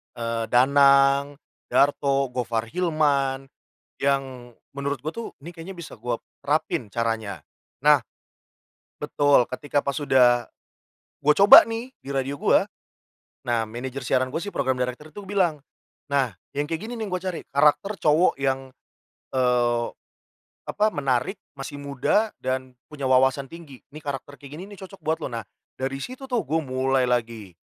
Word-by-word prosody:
eee, 115 -1 -2
Danang, 140 +2 +4 0.3
Darto, 140 -2 +2
Gofar 115 -2 -2
Hilman, 140 -6 0 0.5
yang 135 -3 -1 0.2
menurut 140 0 -2
gue 155 - -1
tuh, 230 - -5
nih 170 +5 -11
kayaknya 175 +3 -9
bisa 170 - -8
gue - - -3 0.2
terapin 105 - -1
caranya. 110 -7 -3 0.4
Nah - - +6 1.0
betul 145 -4 +3
ketika 145 +2 -1
pas 140 - -2
udah 125 -4 +4 0.8
gua 150 - +6
coba 200 +1 +10
nih 230 +2 -4
di 135 - -12
radio 135 +1 -2
gua, - - +3 0.7
nah 115 -2 0
manajer 125 +4 -6
siaran 130 0 +2
gua 145 - -5
sih 205 +4 -6
program 130 -2 0
director 125 +4 -3
itu 205 +6 -10
bilang, 185 -6 +1 0.5
"Nah 130 -8 +1 0.2
yang 145 +1 -2
kayak 165 - 0
gini 235 - -7
nih, 225 -2 -4
yang - - -8
gua 180 0 -2
cari, 185 -3 -3
karakter 150 +9 +3
cowok 155 +4 +4
yang, 135 -1 -1 0.6
eee, 120 -2 +2 0.8
apa, 210 - +1
menarik, 135 - -1 0.2
masih 145 +1 -7
muda 140 - +1
dan 130 0 -3 0.2
punya 140 -3 -3
wawasan 130 +1 +3
tinggi, 160 -6 -12
nih 150 +1 -12
karakter 140 0 -5
kayak 140 -1 -13
gini 175 +6 -8
nih 205 - -11
cocok 195 +1 -14
buat 160 +1 0
lo." - - -4
Nah 115 -1 -3 0.4
dari 135 +1 -2
situ 260 +2 -8
tuh 245 -4 0
gue 160 +2 0
mulai 130 -1 0
lagi, 115 -6 -2
140 Hz, 150 wpm, -24 LUFS, 125-155 Hz, 1.0 s, coba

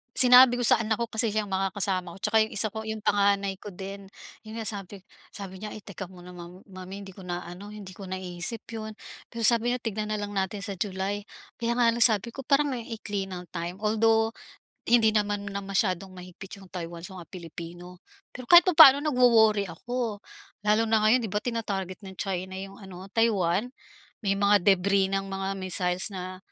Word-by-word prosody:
Sinabi 250 -1 +7
ko 245 - 0
sa - - +6
anak 220 0 -1
ko, 235 - -1
kasi 220 -1 0
siyang 210 -1 -1
makakasama 190 -2 -1
ko - - -12
'tsaka 210 +1 0
'yong 220 - -10
isa 215 +2 +1
ko 220 +1 -7
'yong 220 0 -4
panganay 200 -1 +2
ko 205 +1 -10
din. 195 +2 -8 0.4
'Yon 220 +1 -7
nga 220 - -1
sabi 200 -1 -6 0.3
sabi 190 -2 -8
niya, 210 +2 -7
eh, - - -8
"Teka 200 -1 -8
muna 180 0 -12
mom 175 +1 -11
mommy 185 +1 -9
'di 195 -2 -11
ko 190 - -11
na 175 0 -3
ano, 200 +4 -9
hindi 195 -3 -10
ko 195 - -9
naisip 185 +3 -4
'yon." 220 -1 -6 0.4
Pero 235 - -6
sabi 235 +1 +3
niya, 250 - -2
"Tignan 215 -1 -3
na 210 - -2
lang 205 0 -5
natin 195 +1 -1
sa 200 -1 -4
July." 195 +1 -3 0.3
Kaya 235 0 -1
nga 235 - +5
lang 230 0 +4
sabi 220 -1 +3
ko 270 +3 -8
parang 280 -1 +2
ang 230 - -6
ikli 210 -4 -4
ng 180 -2 -8
time. 175 +5 -6
Although, 225 +1 +2 0.5
hindi 225 -2 +4
naman 205 -1 0
na 200 0 -4
masyadong 195 -1 -1
mahigpit 185 +2 -11
'yong 195 - -14
Taiwan 170 -2 -6
sa 190 - -12
mga - - -24
Pilipino. 175 0 -10 0.3
Pero 250 +4 -6
kahit 345 +2 +9
papano 310 -6 +9
nagwo-worry 235 -7 +4
ako, 230 +3 -4 0.4
lalo 210 +2 +2
na 220 -1 +2
ngayon 240 +2 +4
'di 215 - -4
ba, 210 - 0
tina-target 210 -5 -4
ng 190 -1 -9
China 190 -1 -3
'yong 195 0 -8
ano, 190 0 -10
Taiwan. 215 -1 +1 0.5
May 195 -1 0
mga 200 -1 +4
debris 195 0 +3
ng 195 0 -1
mga 195 0 -3
missiles 185 0 -2
na 185 0 -6
200 Hz, 200 wpm, -27 LUFS, 190-220 Hz, 0.5 s, kahit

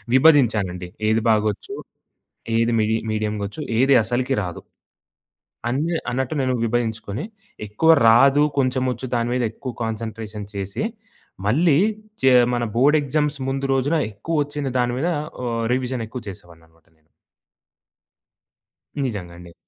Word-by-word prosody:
విభజించానండి. 110 - +3 0.2
ఏది 110 0 +2
బాగొచ్చు, 105 -2 -1 0.8
ఏది 115 +1 +2
మిడి 110 +1 +2
మీడియంగా 105 -1 -2
ఒచ్చు, 130 - -8 0.2
ఏది 135 +1 +5
అసలకి 125 +4 -1
రాదు. 90 -2 -6 1.1
అన్నీ 155 +7 0
అన్నట్టు 130 +3 -2
నేను 130 -1 0
విభజించుకొని 115 -2 -2 0.4
ఎక్కువ 135 +11 +2 0.2
రాదు, 135 +5 +6 0.2
కొంచెం 130 -1 +1
ఒచ్చు 125 +3 -7
దాని 120 0 -1
మీద 125 - 0
ఎక్కువ 130 +2 -6
కాన్సన్‌ట్రేషన్ 110 -2 -5
చేసి 100 - -3 0.6
మళ్ళీ 145 +7 +3 0.4
ఒచ్చే 130 -9 +3 0.2
మన 120 -1 0
బోర్డ్ 140 +6 +4
ఎగ్జామ్స్ 150 +1 -1
ముందు 135 +1 -1
రోజున 135 +5 +1
ఎక్కువ 145 +10 -1
ఒచ్చిన 145 -1 -4
దాని 120 -1 +1
మీద 160 +6 0 0.4
ఆహ్, 115 -1 -1
రివిజన్ 125 -2 -2
ఎక్కువ 125 +1 -7
చేసేవాడిననమాట 85 -3 -13
నేను. 80 -1 -37 2.0
నిజంగండి. 90 -7 -7
120 Hz, 120 wpm, -22 LUFS, 105-135 Hz, 2.0 s, రాదు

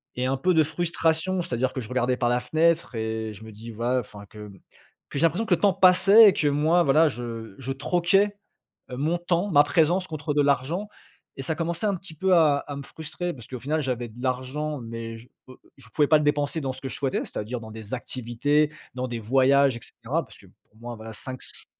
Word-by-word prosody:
et 125 +1 -1
un 135 +1 0
peu 180 +6 +2
de 160 -1 +5
frustration. 165 +2 -1
C'est-à-dire 130 -3 -1
que 130 - -4
je 110 - -8
regardais 125 0 0
par 120 - +1
la 125 0 +2
fenêtre 160 0 +1
et 110 0 -3
je 105 - -12
me 110 - -10
dis: 115 +3 -10
«Va» 120 +3 0
enfin, 105 -3 -9
que 105 0 -11 0.6
que 140 - -4
j'ai - - 0
l'impression 180 +8 +1
que 195 - +2
le - - -10
temps 200 -2 +4
passait 195 +4 +7
et - - +1
que 150 - 0
moi 155 +5 +3
voilà, 155 +3 +4
je 115 -5 -7
je 135 0 -4
troquais, 180 +8 +1 0.5
heu, 125 - -5
mon 160 +5 0
temps, 175 +3 0
ma 145 -1 +6
présence 175 +4 +2
contre 155 -1 -4
de 145 - +3
l'argent 145 +8 0 0.5
et - - -4
ça 160 - -1
commençait 170 +5 -2
un 200 - +1
petit 175 -2 -11
peu 190 +4 +1
à 150 -4 +4
à 145 - -5
me 140 - -6
frustrer 160 +4 -6
parce 120 -4 -12
qu'au 125 -2 -7
final, 155 +5 -1
j'avais 125 -3 -3
de 115 +3 -15
l'argent 130 +3 -2
mais 115 0 -7
je 120 - -16 0.5
je 130 -5 -17
pouvais 145 +5 +2
pas 155 - +6
le - - -1
dépenser 145 +2 0
dans 135 -2 -2
ce 130 - -13
que 135 - -5
je - - -5
souhaitais, 135 -2 -1
c'est-à-dire, 115 +3 -5
dans 110 - -9
des 110 +1 -8
activités, 130 +5 0 0.2
dans 130 0 -3
des 120 -1 -4
voyages 135 +3 +3
et - - -13
cetera, - - -4
parce - - -17
que - - -17
pour 105 - -29
moi, 120 +1 -7
voilà, 110 0 -9
5 130 +4 -5
si - - -7
140 Hz, 235 wpm, -25 LUFS, 120-165 Hz, 0.6 s, passait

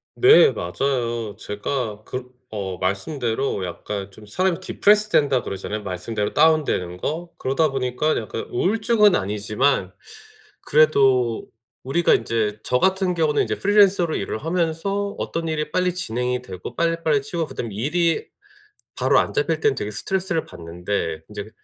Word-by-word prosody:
네. 435 +3 +7
맞아요. 120 -5 -2
제가 105 0 -4
그렇 125 +2 -6 0.3
어 95 -3 -4
말씀대로 110 +3 -1
약간 100 +3 -6
좀 105 +2 -14
사람이 180 - 0
'디프레스된다.' 200 -9 +3
그러잖아요. 105 +2 -5
말씀대로 105 +3 -3
다운되는 150 - +2
거. 165 - -4
그러다 145 +4 +1
보니까 135 +3 0
약간 110 0 -4
우울증은 210 - +3
아니지만 105 +1 0 0.7
그래도 135 -6 +3 0.4
우리가 150 +6 +2
인제 110 -2 -1
저 125 - +1
같은 190 +1 +2
경우는 160 -3 +2
인제 - - -3
프리랜서로 200 -4 +4
일을 110 - -3
하면서 180 +4 -1
어떤 165 0 -3
일이 150 -1 -2
빨리 180 +1 +1
진행이 125 -6 -2
되고 95 -7 -8
빨리빨리 165 -3 +1
치우고 165 +4 -3
그다음에 115 -7 -6
일이 160 - 0 0.7
바로 - - +4
안 - - -2
잡힐 425 0 0
때는 435 -1 +2
되게 - - -3
스트레스를 190 -4 -1
받는데 85 -1 -4
인제 105 0 -7
135 Hz, 345 characters per minute, -22 LUFS, 105-170 Hz, 0.7 s, 네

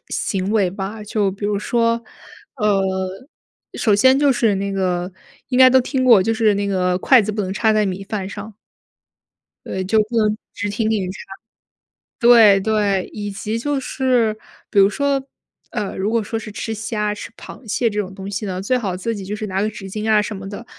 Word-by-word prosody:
行 190 0 -2
为 200 -5 +2
吧。 200 +3 -6
就 210 -1 0
比 200 +2 -8
如 205 -1 0
说， 230 +2 0 0.5
呃， 210 -2 +1 0.9
首 215 -4 +2
先 260 +6 +5
就 285 -1 +4
是 230 -4 +2
那 200 +1 -2
个， 180 -2 -1 0.4
应 250 - 0
该 260 0 +9
都 260 0 +5
听 260 +1 -1
过， 230 -7 +7
就 225 - 0
是 220 -2 +2
那 200 0 -1
个 180 -2 +1
筷 255 +6 +5
子 215 0 -2
不 210 0 -2
能 190 -1 -3
插 220 +2 +2
在 215 0 +2
米 190 +1 -4
饭 195 -1 -4
上。 205 +1 -9 1.1
对， 190 - -3
就 220 +4 +2
不 235 +2 -6
能 215 -1 +2 0.2
直 205 - -3
挺 215 +2 -1
挺 200 -5 -1
插 190 - -8 1.0
对， 230 -5 +7
对， 205 -3 0
以 205 -1 -5
及 210 +3 -4
就 285 +3 -1
是 250 -5 0 0.3
比 205 - +2
如 195 - +6
说 280 +3 0 0.5
呃， 210 -4 -3
如 195 +2 -1
果 230 0 +1
说 225 +2 -3
是 215 - -8
吃 220 +2 -4
虾、 210 -1 -2
吃 210 - -8
螃 240 - -12
蟹 230 +3 +1
这 210 -1 -3
种 195 -2 -4
东 195 0 -7
西 205 +2 -3
呢， 185 -2 -4
最 250 +6 +1
好 200 -7 -3
自 210 +5 -3
己 200 -2 -7
就 205 +2 -4
是 215 0 -5
拿 190 0 -1
个 215 - 0
纸 205 -2 -9
巾 215 +3 -3
啊 215 -1 +5
什 210 +1 -4
么 195 0 -8
的， 205 +4 -8
210 Hz, 225 characters per minute, -20 LUFS, 195-225 Hz, 1.1 s, 该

